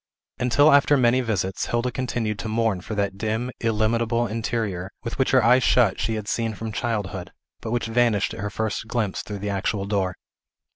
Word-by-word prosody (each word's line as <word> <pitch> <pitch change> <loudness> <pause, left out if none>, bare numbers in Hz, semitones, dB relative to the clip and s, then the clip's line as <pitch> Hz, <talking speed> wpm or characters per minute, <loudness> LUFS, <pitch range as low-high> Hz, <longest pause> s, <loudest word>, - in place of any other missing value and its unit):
Until 135 +5 +4
after 145 +1 +5
many 125 0 +3
visits, 100 -5 -2
Hilda 120 +1 0
continued 115 -4 -2
to - - -4
mourn 110 -4 0
for 110 - -6
that 100 -1 -1
dim, 110 +4 -1
illimitable 115 +1 +1
interior, 110 -4 -2
which 115 +2 -6
with 130 - +2
her 130 -2 +4
eyes 125 +3 +5
shut 115 -8 +3
she 115 - -1
had 105 -2 -5
seen 115 -1 -1
from 110 +2 -5
childhood, 100 -5 -3 0.3
but - - -5
which 120 +1 -1
vanished 115 -3 +1
at - - -8
her 105 +1 -2
first 110 +1 -3
glimpse 110 -4 -1
through 105 - -6
the 100 +1 -3
actual 100 0 -1
door. 95 -3 -1
110 Hz, 190 wpm, -24 LUFS, 105-120 Hz, 0.3 s, after